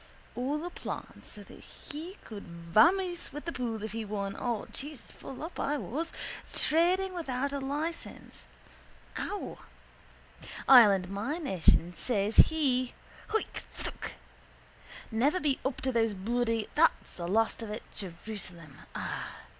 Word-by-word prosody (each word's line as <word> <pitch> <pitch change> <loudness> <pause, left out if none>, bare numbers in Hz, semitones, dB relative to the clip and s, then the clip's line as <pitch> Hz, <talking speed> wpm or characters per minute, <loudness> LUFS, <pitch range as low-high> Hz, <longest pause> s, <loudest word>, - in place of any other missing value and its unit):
all 290 +6 -1
a 355 - -4
plan - - -6
so - - -11
he 335 +7 -9
could 210 -2 -7 0.3
vamoose 350 - +4
with 295 +2 -7
the 335 - -1
pool 230 -6 -3
if 220 - -3
he 225 +1 -3
won 200 -1 -3
or 235 -4 -1
(Jesus, 290 -1 -7
full 270 - -8
up 330 - -6
I 295 +1 +1
was) 315 +5 -3 0.4
trading 365 +4 +3
without 280 -5 -2
a 280 - -1
licence 295 +5 -4 0.7
(ow!) 410 - -4 1.1
Ireland 205 -8 +8
my 205 - -2
nation 185 - +3
says 210 +1 0
he 260 -6 +5 0.3
(hoik! 440 - -1
phthook!) - - -4 1.0
never 275 +11 +3
be 290 -5 +1
up 265 -1 -1
to 260 - +1
those 225 -3 +2
bloody 230 +2 0
(there's 330 +2 +7 0.3
the 170 -1 -4
last 225 +5 +2
of 225 - -5
it) 210 +2 -5
Jerusalem 175 -5 -7 0.2
ah! - - -4
250 Hz, 135 wpm, -31 LUFS, 215-305 Hz, 1.1 s, Ireland